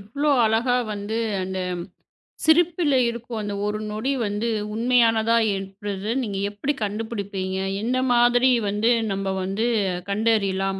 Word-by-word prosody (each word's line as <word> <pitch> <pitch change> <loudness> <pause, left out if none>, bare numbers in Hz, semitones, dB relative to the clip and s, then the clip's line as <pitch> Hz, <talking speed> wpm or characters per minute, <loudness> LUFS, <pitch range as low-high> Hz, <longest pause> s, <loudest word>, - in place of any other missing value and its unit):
இவ்ளோ 280 +9 -1 0.2
அழகா 235 +3 +2 0.2
வந்து, 205 +2 -4 0.3
அந்தச் 185 -1 -3 0.7
சிரிப்புல 320 -2 +3
இருக்கும் 235 -1 -5
அந்த 205 -1 -4
ஒரு 210 +1 -2
நொடி 220 +6 -2
வந்து 205 +2 -2 0.3
உண்மையானதா 230 -1 +3 0.2
ஏற்படுறது 195 +2 -5
நீங்க 205 -5 -3
எப்படி 210 +8 -2
கண்டுபிடிப்பீங்க? 200 -3 -3 0.2
எந்த 250 +3 0
மாதிரி 245 +1 +4 0.2
வந்து 210 +3 +1 0.2
நம்ம 195 0 -2
வந்து 195 +4 -1 0.4
கண்டறியலாம்? 200 -3 +1
215 Hz, 115 wpm, -23 LUFS, 200-240 Hz, 0.7 s, மாதிரி